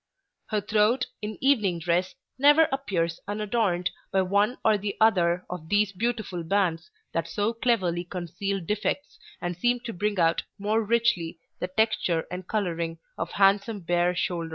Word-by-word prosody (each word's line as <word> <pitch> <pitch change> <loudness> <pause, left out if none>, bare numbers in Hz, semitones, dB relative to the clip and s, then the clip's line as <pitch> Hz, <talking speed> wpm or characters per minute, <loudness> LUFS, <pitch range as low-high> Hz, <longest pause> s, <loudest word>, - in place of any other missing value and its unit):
Her 215 -2 0
throat, 215 +5 +2 0.2
in 210 0 -5
evening 215 -10 +3
dress, 175 +3 0 0.2
never 295 +3 +6
appears 175 -12 -1
unadorned 205 -4 0 0.2
by 190 0 +3
one 205 +6 +2
or 220 - +5
the 200 0 -3
other 180 -5 +3
of 165 -3 -7
these 205 -1 +3
beautiful 215 -4 -2
bands 170 -2 0 0.2
that 165 0 -1
so 205 +6 -1
cleverly 195 -8 +1
conceal 180 +2 -3
defects 210 - -2 0.2
and 175 0 -2
seem 240 +7 +1
to 235 -2 -6
bring 205 +2 -1
out 165 -1 +3 0.2
more 215 +2 +1
richly 215 -7 +1 0.2
the 180 - -2
texture 185 -4 +1
and 180 0 -6
coloring 170 -6 -2 0.2
of 165 +1 -4
handsome 200 +2 +3
bare 175 +1 +1
shoulders. 170 -2 -2
195 Hz, 155 wpm, -26 LUFS, 175-220 Hz, 0.2 s, never